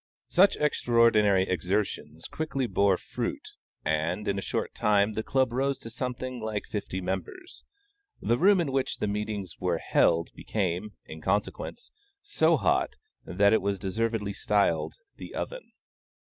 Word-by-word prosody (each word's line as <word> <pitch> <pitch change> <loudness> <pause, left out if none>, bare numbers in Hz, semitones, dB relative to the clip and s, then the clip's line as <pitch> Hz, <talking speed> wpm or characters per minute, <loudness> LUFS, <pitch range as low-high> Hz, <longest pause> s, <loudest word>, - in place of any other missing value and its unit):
Such 190 +3 +5
extraordinary 115 -8 +4
exertions 95 +4 -2
quickly 140 -4 -2
bore 100 -5 +3
fruit, - - -5 0.4
and, 80 +6 0
in 100 0 0
a - - -4
short - - -3
time 105 0 +2
the 110 - -1
Club 130 +1 +1
rose 135 +2 0
to 115 - -10
something 125 +1 -4
like 110 -2 -3
fifty 100 -3 -4
members. 95 - -5 0.6
The 120 - +1
room 195 +2 +5
in 160 -6 0
which 135 -1 -1
the - - -1
meetings 105 -3 -3
were 90 -2 0
held 85 0 +2
became, 100 0 -2
in 80 0 -9
consequence, 100 - -2 0.3
so 410 0 +3
hot, - - +1 0.3
that 100 +3 +3
it 110 - +4
was 100 0 -1
deservedly 105 +1 -1
styled 85 -7 +1 0.2
"the - - -9
oven." - - -5
105 Hz, 145 wpm, -28 LUFS, 95-125 Hz, 0.6 s, Such